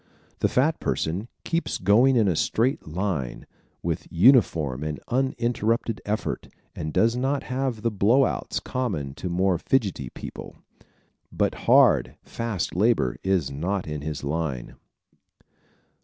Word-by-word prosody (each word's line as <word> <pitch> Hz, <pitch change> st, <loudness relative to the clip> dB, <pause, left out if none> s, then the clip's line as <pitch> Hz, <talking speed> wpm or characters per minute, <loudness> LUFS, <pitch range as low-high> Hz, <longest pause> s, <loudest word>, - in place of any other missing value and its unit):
The -, -, +3 dB
fat 155 Hz, +6 st, +1 dB
person 90 Hz, +8 st, -2 dB, 0.2 s
keeps 170 Hz, 0 st, -1 dB
going 115 Hz, +8 st, +4 dB
in 110 Hz, -4 st, +4 dB
a 90 Hz, -, +2 dB
straight 120 Hz, -, 0 dB
line, 80 Hz, -6 st, -3 dB, 0.4 s
with -, -, -2 dB
uniform 85 Hz, -, +4 dB
and 75 Hz, -2 st, -3 dB
uninterrupted 120 Hz, -3 st, 0 dB
effort, 105 Hz, +1 st, -2 dB, 0.3 s
and 75 Hz, 0 st, -4 dB
does 110 Hz, +8 st, +3 dB
not 135 Hz, +3 st, 0 dB
have 130 Hz, -3 st, -3 dB
the 115 Hz, -, +1 dB
blow 110 Hz, +7 st, +4 dB
outs -, -, -2 dB
common 95 Hz, -, -3 dB
to 90 Hz, -, -5 dB
more 90 Hz, 0 st, +1 dB
fidgety 95 Hz, -, 0 dB
people. -, -, -9 dB, 0.8 s
But -, -, 0 dB, 0.2 s
hard, -, -, +5 dB
fast 115 Hz, -5 st, -3 dB
labor 100 Hz, -, +2 dB
is 95 Hz, -8 st, +1 dB
not 90 Hz, +7 st, -2 dB
in 75 Hz, -1 st, -4 dB
his 75 Hz, -1 st, -5 dB
line. 70 Hz, -4 st, -3 dB
100 Hz, 130 wpm, -25 LUFS, 80-120 Hz, 0.8 s, hard